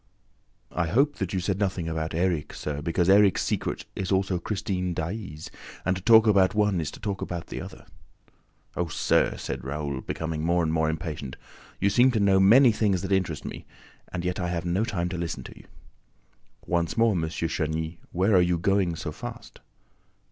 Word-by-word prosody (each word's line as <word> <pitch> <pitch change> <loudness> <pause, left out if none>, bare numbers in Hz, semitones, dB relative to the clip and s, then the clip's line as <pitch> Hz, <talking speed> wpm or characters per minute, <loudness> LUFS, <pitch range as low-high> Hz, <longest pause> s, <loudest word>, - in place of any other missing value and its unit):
"I 85 -2 -1
hope 140 - +2
that 95 -3 -3
you 95 - -1
said 95 +2 -1
nothing 95 -4 -1
about 80 0 -3
Erik, 85 -3 -1
sir, 75 -1 -4
because 85 +2 0
Erik's 100 -1 +5
secret - - -2
is 95 0 -3
also 95 -1 +1
Christine 90 -3 -2
Daae's 85 -2 -5 0.3
and 95 - +2
to 95 - -6
talk 110 +2 +7
about 100 -2 +4
one 105 -4 +2
is 80 - -3
to - - -11
talk 100 -3 -3
about 85 -2 -4
the - - -6
other!" - - -10 0.9
"Oh, 90 - -1
sir," - - +1
said - - -5
Raoul, 70 0 -3
becoming 80 -1 -4
more 85 +1 +2
and 80 -1 0
more 80 -1 +2
impatient, 75 -4 -5 0.4
"you 100 +1 +2
seem 125 +4 +5
to 110 - +1
know 100 -1 +4
about 95 - +5
many 125 +3 +7
things 100 -4 0
that 95 - -4
interest 95 -6 0
me; - - -7 0.4
and 90 0 -4
yet 90 +2 -1
I 90 - -1
have 85 -1 -3
no 90 +5 +1
time 90 -6 -2
to 90 -1 -4
listen 85 -1 -4
to - - -10
you!" - - -16 1.0
"Once 85 +5 -1
more, 115 0 +4
M. 90 -5 0
de 80 - -1 0.2
Chagny, 80 +1 -3
where 95 +4 +2
are 90 - +6
you 90 0 +2
going 95 -1 +1
so 80 - -5
fast?" - - -9
90 Hz, 200 wpm, -26 LUFS, 80-100 Hz, 1.0 s, talk